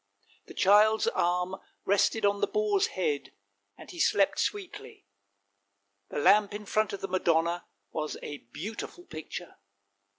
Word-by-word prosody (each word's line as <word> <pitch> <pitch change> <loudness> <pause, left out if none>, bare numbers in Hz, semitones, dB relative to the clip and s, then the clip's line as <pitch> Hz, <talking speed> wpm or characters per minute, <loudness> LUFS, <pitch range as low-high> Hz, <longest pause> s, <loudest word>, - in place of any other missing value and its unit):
The - - -12
child's 210 +3 +5
arm 180 - 0 0.3
rested 205 +2 +2
on 200 0 +2
the - - +3
boar's 420 -1 +1
head, 445 -2 -1 0.4
and - - -11
he 350 - -10
slept - - +3
sweetly; 395 - -4 1.0
the - - -5
lamp 205 +7 +4
in 210 0 -7
front 215 +1 +1
of 200 - -6
the 195 - -3
Madonna 170 -2 +1 0.2
was 155 -1 -3
a 145 -1 -6
beautiful 225 - -7
picture. 160 - -8
200 Hz, 135 wpm, -29 LUFS, 175-225 Hz, 1.0 s, child's